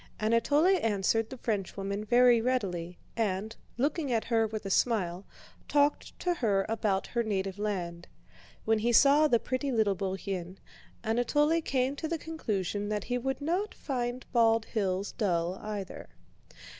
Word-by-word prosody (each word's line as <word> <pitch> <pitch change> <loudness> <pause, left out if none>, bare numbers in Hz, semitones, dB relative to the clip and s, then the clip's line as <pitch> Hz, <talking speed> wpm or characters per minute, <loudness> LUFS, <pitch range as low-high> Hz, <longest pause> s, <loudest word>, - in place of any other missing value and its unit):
Anatole 230 +8 +3
answered 220 - +1
the 260 - -8
Frenchwoman 200 -2 -3
very 240 +1 +5
readily 185 -9 -2 0.2
and, 215 0 -1 0.2
looking 285 +2 0
at 225 -2 +1
her 225 -1 +1
with 215 -1 -6
a 195 - -3
smile, 190 -5 +1 0.4
talked 290 0 +1
to 355 - +1
her 205 - +1
about 210 -3 0
her 235 - -1
native 195 -3 -2
land. 175 -5 -3 0.6
When 220 0 +3
he 235 +2 +1
saw 285 +5 +6
the 240 - +4
pretty 255 +4 -2
little 220 -4 +2
Bourienne, 190 -1 -4 0.5
Anatole 295 +8 +2
came 265 -2 0
to 315 - -3
the 335 +1 -1
conclusion 205 - -3
that 210 -1 -1
he 245 0 -2
would 265 +3 -3
not 360 +8 -1
find 245 -2 -3
Bald 225 -1 +4
Hills 195 -3 -1
dull 180 -4 -1
either. 210 -3 -6
225 Hz, 145 wpm, -30 LUFS, 195-255 Hz, 0.6 s, saw